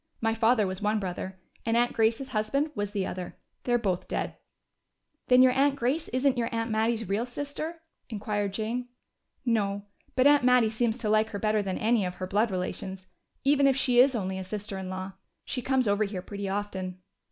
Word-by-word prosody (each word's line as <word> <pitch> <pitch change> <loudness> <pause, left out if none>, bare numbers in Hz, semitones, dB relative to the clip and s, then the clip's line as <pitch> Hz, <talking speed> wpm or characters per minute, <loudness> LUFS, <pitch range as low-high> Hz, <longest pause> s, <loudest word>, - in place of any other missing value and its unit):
My 225 0 +1
father 225 -1 +3
was 185 0 -4
one 210 +1 +1
brother, 185 0 -5 0.2
and 230 0 +1
Aunt 240 0 +2
Grace's 230 +4 +1
husband 265 +7 0
was 205 -5 -2
the 200 -2 -2
other. 180 -1 -6 0.3
They're 240 -1 +3
both 190 -6 -1
dead." - - -2 0.9
"Then 250 0 +7
your 255 - +6
aunt 275 +2 +3
Grace 280 +5 0
isn't 255 0 +1
your 230 - 0
aunt 230 0 -2
Mattie's 225 0 +1
real 210 +6 0
sister?" 290 +5 -5 0.3
inquired 205 -2 -2
Jane. 230 +5 -3 0.6
"No. 205 -4 0 0.3
But 255 +1 +3
Aunt 290 -2 +6
Mattie 250 -3 +5
seems 225 0 0
to 220 -4 -2
like 215 +1 +3
her 205 - -5
better 215 0 +2
than 190 -2 -2
any 225 -1 +2
of 180 -1 -3
her 185 - -4
blood 210 +5 +1
relations, 190 0 -4 0.4
even 280 0 +4
if 270 - +4
she 250 -2 +3
is 260 +1 +6
only 190 -3 -2
a - - -4
sister 205 +1 -5
in 190 -1 -5
law. 185 +1 -5 0.3
She 250 - -3
comes 260 -1 +1
over 205 +1 +3
here 195 -3 -5
pretty 200 0 -5
often." 190 -2 -3
220 Hz, 200 wpm, -28 LUFS, 200-250 Hz, 0.9 s, Then